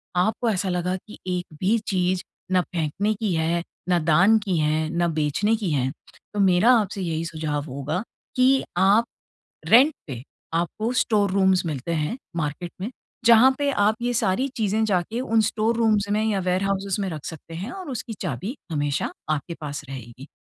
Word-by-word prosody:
आपको 220 +6 +1
ऐसा 190 -2 0
लगा 180 +1 0
कि 215 - -11
एक 180 -1 -1
भी 205 +5 +3
चीज़ 185 -1 +1 0.3
ना 185 -1 +4
फेंकने 175 +6 -1
की 210 -3 -2
है, 165 +1 0 0.3
ना 175 -1 +4
दान 175 +8 +5
की 195 -5 -1
है, 155 +1 +1
ना 170 +1 +1
बेचने 160 +8 +1
की 200 -7 -2
है। 135 -2 +1 0.4
तो 205 - -3
मेरा 190 +4 +5
आपसे 200 -1 -3
यही 165 -2 -2
सुझाव 155 -3 -3
होगा 145 +6 -2 0.3
कि 260 +1 +4
आप 200 +5 +5 0.6
रेंट 270 +7 +7
पे 125 -4 -6 0.3
आपको 175 +8 -1
स्टोर 205 -4 +2
रूम्स 190 -2 +3
मिलते 155 0 -3
हैं 155 - -1 0.2
मार्केट 165 +2 -3
में, 210 - -2 0.4
जहाँ 235 +3 +7
पे 285 -1 +1
आप 210 -2 +2
ये 245 0 0
सारी 230 +4 +1
चीज़ें 220 0 +1
जाके 205 +4 0
उन 225 -4 +2
स्टोर 220 +2 +1
रूम्स 215 -3 +2
में 215 +1 +2
या 210 -3 +1
वेयरहाउसेज़ 195 +2 0
में 195 - -1
रख 155 -3 -7
सकते 165 0 -8
हैं 190 +7 -5
और 370 -4 -7
उसकी 235 -1 -5
चाबी 185 - -3 0.2
हमेशा 145 -2 -1 0.2
आपके 155 +3 -1
पास 145 -1 -5
रहेगी। 130 0 -9
185 Hz, 175 wpm, -24 LUFS, 160-215 Hz, 0.6 s, रेंट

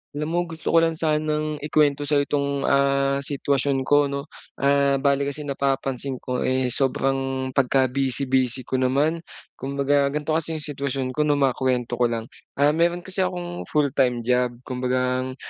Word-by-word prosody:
Alam 150 +2 -3
mo, 175 - +1
gusto 160 0 -4
ko 165 - +6
lang 165 0 +1
sanang 155 -1 -1
ikuwento 145 -1 +1
sa'yo 145 -1 +3
'tong, 140 -1 -1
ah, 140 0 +2
sitwasyon 140 -1 0
ko, 145 +1 +3
'no? 140 0 -4 0.3
Ah, 140 0 +3
bale, 140 0 +1
kasi 145 +2 -4
napapansin 135 -2 -2
ko, 125 -1 -2
eh, 130 -1 0
sobrang 135 0 0
pagka 130 -1 +2
busy 135 0 -1
busy 130 -1 0
ko 130 - -2
naman. 140 +6 +1 0.4
Kumbaga, 140 +1 +1
ganito 150 +2 -2
kasi 160 0 -1
'yong 155 - -5
sitwasyon 135 -3 -3
ko, 150 +3 0
'no, 145 - +3
makuwento 125 -3 0
ko 120 - +4
lang. 115 -1 -4 0.2
Ah, 145 +1 +4
meron 170 +2 +1
kasi 190 +1 -6
akong 175 -1 -3
full-time 135 -5 +1
job. 125 0 +1
Kumbaga, 130 0 -1
140 Hz, 165 wpm, -23 LUFS, 130-150 Hz, 0.4 s, ko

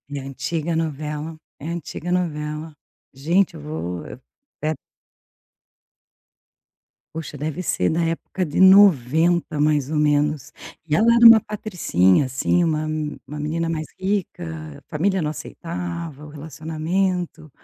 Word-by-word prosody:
É - - -2
antiga 150 +5 -3
novela, 155 0 -3 0.2
é 150 - -7
a - - -3
antiga 170 +1 -5
novela, 155 -3 -2 0.4
gente 165 +8 +1
eu - - -9
vou, 80 +4 -5 0.6
pe 155 - -3 2.5
Poxa, 155 -2 -6
deve 155 +5 -3
ser - - 0
da 165 +2 0
época 165 +3 -2
de 150 0 -2
90 170 -4 +5
mais 145 -2 +2
ou 155 - -1
menos, 150 0 +1 0.3
e 150 - 0
ela 215 +8 +3
era 235 0 +7
uma 230 -1 +10
patricinha 165 - +1
assim, 135 +7 +1
uma 155 -2 0 0.4
uma 150 +1 -7
menina 165 +3 -2
mais 155 -1 -3
rica, 85 - -3
a - - -17
família 190 +4 0
não 150 - -1
aceitava 170 -2 -6
o - - -11
relacionamento, 160 +3 -3
155 Hz, 130 wpm, -22 LUFS, 150-175 Hz, 2.5 s, uma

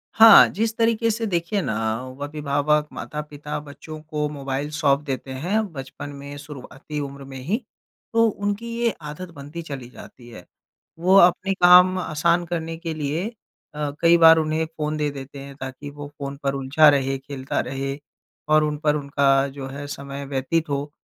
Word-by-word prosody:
हाँ, 220 -2 +10
जिस 225 +2 -1
तरीके 230 0 +2
से 225 +1 -2
देखिए 175 +2 -1
ना 110 - -2 0.5
अभिभावक, 150 0 0
माता-पिता 150 0 -6
बच्चों 150 +2 -10
को 150 -1 -2
मोबाइल 140 0 -4
सौंप 140 0 +3
देते 135 -1 -4
हैं 185 +12 -1
बचपन 135 +1 -7
में, 140 0 -9
शुरुआती 145 0 -8
उम्र 140 -1 -6
में 135 0 -9
ही, 175 - -1 0.6
तो 230 0 +5
उनकी 205 +3 -3
ये 235 - +3
आदत 150 +5 -7
बनती 145 +3 -8
चली 140 -6 -7
जाती 120 -1 -13
है। 90 -6 -12 0.5
वो 185 +3 +4
अपने 185 +2 +5
काम 180 0 +7
आसान 170 +2 +1
करने 165 -1 -4
के 165 -1 -4
लिए 155 +6 -2 0.5
अ, 150 -1 -2
कई 170 0 +6
बार 165 -1 +8
उन्हें 155 +1 0
फ़ोन 155 -1 -4
दे 150 -1 0
देते 140 0 -9
हैं 140 0 -10
ताकि 135 +1 -7
वो 145 0 -8
फ़ोन 140 0 -5
पर 140 - 0
उलझा 140 +3 +4
रहे, 135 -1 +1
खेलता 135 0 -4
रहे 135 +1 -4 0.5
और 155 0 +5
उन 150 -1 -1
पर 150 -1 +3
उनका 140 -1 +2
जो 135 - -5
है 140 +2 -7
समय 140 0 -6
व्यतीत 140 +4 -1
हो। 140 +1 -2
150 Hz, 170 wpm, -23 LUFS, 140-165 Hz, 0.6 s, हाँ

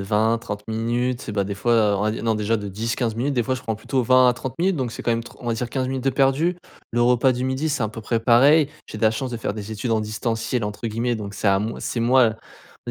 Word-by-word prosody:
20-30 105 +1 0
minutes, 120 +3 -1
c'est, 105 - -6
bah, 100 - +1
des 100 +1 -4
fois, 120 +4 +1
heu, 105 -3 +3
on 100 - -1
va 105 - +1
dire - - -5
non, 110 -1 +1
déjà, 105 +2 +1
de 100 -2 -5
10-15 115 +3 -2
minutes, 135 +4 -1
des 120 - +2
fois, 130 +3 -1
je 125 - -9
prends 115 - -2
plutôt 125 +4 -1
20 130 +1 +6
à - - +4
30 125 0 -6
minutes. 185 0 +2
Donc, 125 -5 -2
c'est - - -7
quand - - 0
même, 115 0 0
tr - - -13
on 120 - -9
va 115 - +1
dire 120 +1 -3
15 130 +1 -2
minutes 130 -1 -3
de 135 - +3
perdues. 135 +6 +2 0.4
Le 120 +1 +2
repas 125 +2 +4
du 125 0 -3
midi, 130 +4 -1
c'est 145 -4 -1
à 110 - 0
peu 115 +2 -8
près 115 +1 -1
pareil. 135 +6 +5 0.2
J'ai 110 - -8
de - - -9
la 110 - +5
chance 125 +3 -4
de - - -2
faire 110 - -3
des 105 0 -6
études 110 +3 -3
en 110 -1 +2
distanciel 115 +2 -2
entre 105 +2 -4
guillemets, 115 +2 -1
donc, 105 -1 -7
c'est 105 - 0
à 95 - +4
moi 110 +3 -4
c'est 120 - -3
moi, 125 +3 +4 0.6
on - - -3
115 Hz, 300 wpm, -23 LUFS, 110-130 Hz, 0.6 s, 20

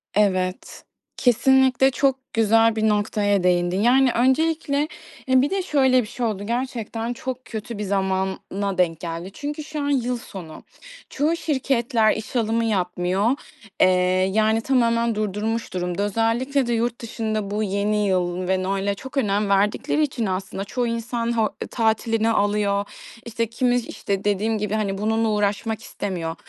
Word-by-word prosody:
Evet. 185 -3 0 0.3
Kesinlikle 265 +1 +4
çok 265 -1 -1
güzel 225 0 +4
bir 220 0 +2
noktaya 205 -2 +1
değindin. 180 +1 +2
Yani, 255 +2 +4
öncelikle 290 +3 +1 0.4
Eee, 260 0 +5
bir 285 - +1
de 390 0 0
şöyle 265 -6 +3
bir 215 - -7
şey 245 +1 -3
oldu. 205 -3 -2
Gerçekten 235 -1 -3
çok 255 +1 -6
kötü 225 -1 -6
bir 210 - -3
zamana 190 0 -2
denk 165 -3 +1
geldi 170 +2 -5
çünkü 295 +1 -5
şu 305 -1 -5
an 285 - -1
yıl 250 -3 0
sonu. 180 -9 -10 0.5
Çoğu 310 +4 0
şirketler 250 -7 +1
iş 220 +3 -7
alımı 230 0 +1
yapmıyor, 185 +1 0 0.5
eee, - - +7 0.5
yani, 220 +1 +2
tamamen 235 -3 +2
durdurmuş 215 +2 -2
durumda. 180 +2 -2
Özellikle 235 +6 0
de 240 - 0
yurt 235 +1 -1
dışında 215 -3 -3
bu 215 +1 -1
yeni 205 +1 0
yıl 180 -1 0
ve 185 0 +1
Noel’e 195 +1 -1
çok 265 +5 -9
önem 205 -4 +1
verdikleri 210 +10 +2
için 260 -6 -2
aslında 190 +1 -3
çoğu 240 +3 -2
insan 230 0 -2
ho 220 -1 +1 0.2
tatilini 225 0 +1
alıyor, 205 -1 +1 0.4
işte, 230 0 -2
kimi, 245 +2 +1
işte, 200 -4 -3
dediğim 210 +2 +1
gibi, 210 0 -3
hani, 200 -3 -1
bununla 220 +2 +1
uğraşmak 210 +2 -1
istemiyor. 170 -5 -4
220 Hz, 150 wpm, -23 LUFS, 200-245 Hz, 0.5 s, eee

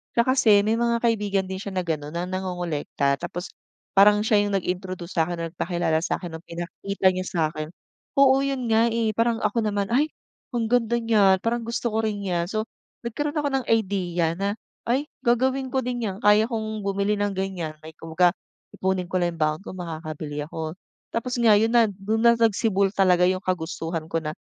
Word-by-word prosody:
siya 235 - +5
kasi 260 -4 +4
may 220 +2 +1
mga 235 0 +1
kaibigan 205 -4 +1
din 190 - -3
siya 200 -1 -6
na 185 - +1
gano'n 150 -1 -3
na 175 - -1
nangongolekta 175 -7 -1
tapos 175 +1 -5 0.5
parang 210 +1 +6
siya 215 -2 +3
yung 205 - -3
nag-introduce 185 -1 -3
sa 160 -2 +2
'kin 175 - -3
na 165 - -2
nagpakilala 170 -2 0
sa - - 0
'kin 175 -3 -7
ng 160 - -10
pinakita 185 +3 -2
niya 185 0 -3
sa 175 - -3
akin. 155 -1 -5 0.5
Oo, 270 0 +6
yun 270 -3 -2
nga, 225 +1 +4
eh, 225 -1 +1
parang 230 0 +1
ako 210 +2 +1
naman, 205 -2 -1
"Ay 280 +6 +3 0.4
ang 235 -2 -1
ganda 235 0 +2
niyan 210 -5 +4
parang 235 +1 0
gusto 235 +1 -1
ko 220 - 0
rin 210 -2 -1
niyan." 175 -3 -1
So 215 +3 -1 0.4
nagkaroon 290 +6 -3
ako 290 -1 0
ng 255 - -8
idea 180 -6 +1
na, 200 +1 -1 0.3
"Ay 265 +5 +1 0.2
gagawin 260 +2 +2
ko 265 - +1
din 245 0 -3
yan, 195 0 -5
kaya 210 +2 +5
ko 235 - -3 0.3
bumili 200 +1 0
ng 205 0 0
ganyan." 185 -5 -3 0.2
Kumbaga 165 +2 +2 0.4
ipunin 190 -1 0
ko 185 - -6
lang 175 -1 0
yung - - -14
baon 155 0 0
ko - - -7
makakabili 155 -4 -6
ako. 160 0 -5 0.4
Tapos 245 +2 -2
nga 225 -3 +6
yon 225 +1 +2
na 230 -2 +6
do'n 200 +3 -2
na 235 - +8
nagsibol 215 -3 +2
talaga 180 -2 +4
yung 185 +1 0
kagustuhan 165 -2 -3
ko 165 - +1
na 155 - -2
200 Hz, 195 wpm, -24 LUFS, 175-230 Hz, 0.5 s, na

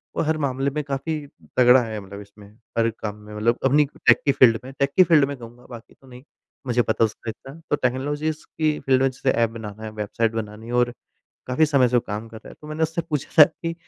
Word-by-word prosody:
वो - - 0
हर 155 0 0
मामले 135 -1 -1
में 150 +2 -3
काफ़ी 140 +3 -3 0.4
तगड़ा 125 0 +7
है 110 -2 -5
मतलब 100 +1 -10
इसमें, 100 0 -15 0.3
हर 115 0 +3
काम 105 -1 -4
में 105 0 -13
मतलब 115 +3 +1
अपनी 145 +3 +4 0.2
टेक - - +7
की 140 - +4
फील्ड 115 -4 +5
में, 130 - -9
टेक 140 0 +1
की 185 - +9
फील्ड 155 -5 +4
में 140 - -5
कहूँगा 120 +1 -13
बाकी 120 -2 -11
तो 135 - -23
नहीं 125 0 -13 0.4
मुझे 120 0 +2
पता 110 0 +1
है - - +7
उसका 110 +1 -6
इतना। 135 +4 -9 0.2
तो - - +3
टेक्नोलॉजीज़ 145 +4 -2
की 155 -1 +1
फील्ड 130 -1 +3
में 135 - +3
जैसे 130 +1 -1
ऐप 115 -1 +1
बनाना 110 -2 -9
है, 110 - -5
वेबसाइट 110 +2 -1
बनानी 110 0 -6
है 120 - -6
और 120 0 +2 0.5
काफ़ी 140 +5 +2
समय 140 -4 +3
से 125 - +1
वो - - +4
काम 105 +2 -5
कर 110 - -12
रहा - - -12
है। - - -11
तो 150 - -12
मैंने 155 +1 -4
उससे 160 +1 0
पूछा 150 -3 -2
था - - +12
कि 165 +2 -6
125 Hz, 250 wpm, -23 LUFS, 115-145 Hz, 0.5 s, था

